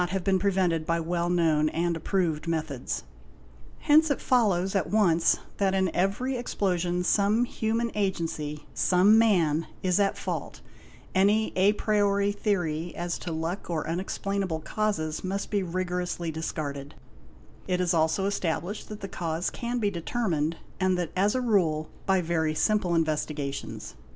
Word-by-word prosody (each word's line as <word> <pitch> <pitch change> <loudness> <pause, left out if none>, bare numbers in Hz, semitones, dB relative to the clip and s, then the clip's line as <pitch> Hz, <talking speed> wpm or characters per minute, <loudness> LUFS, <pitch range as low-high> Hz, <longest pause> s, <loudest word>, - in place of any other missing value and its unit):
have 190 +1 -2
been 190 0 +2
prevented 185 -4 +1
by 165 +1 0
well 170 +1 -1
known 160 -3 +3
and 170 +1 0
approved 165 -2 -1
methods'. 155 -6 -2 0.8
Hence 310 +2 +5
it 285 - 0
follows 195 -7 +2
at 195 - 0
once 175 -6 +3 0.2
that 195 -1 +1
in 190 -3 0
every 205 +8 0
explosion 180 -6 -1
some 210 +5 +3
human 230 0 -1
agency, 165 -7 -2
some 195 +5 +5
man, 165 -8 +3 0.2
is 185 +1 +2
at 200 -1 +2
fault; - - -5 0.5
any 205 +3 +3
a 195 +3 +4
priori 205 -1 +1
theory 175 -6 -1
as 175 0 -3
to 175 - -5
luck 165 +5 -3
or 160 -2 -2
unexplainable 185 0 -2
causes 160 -7 -2
must 195 +1 -3
be 205 -1 +1
rigorously 180 -1 -2
discarded; 145 -3 -5 0.7
it 180 -1 0
is 180 -1 +1
also 160 +4 +2
established 195 0 -2
that 210 -1 -8
the 195 - -4
cause 170 -1 -2
can 240 +1 -3
be 210 -4 +1
determined, 170 -4 -1 0.2
and 185 -1 +2
that 175 -3 -2
as 200 +4 +2
a 255 - +1
rule 170 -10 +1 0.2
by 190 -1 +3
very 160 -2 0
simple 185 -2 +1
investigations. 150 -3 -2
180 Hz, 145 wpm, -27 LUFS, 165-200 Hz, 0.8 s, Hence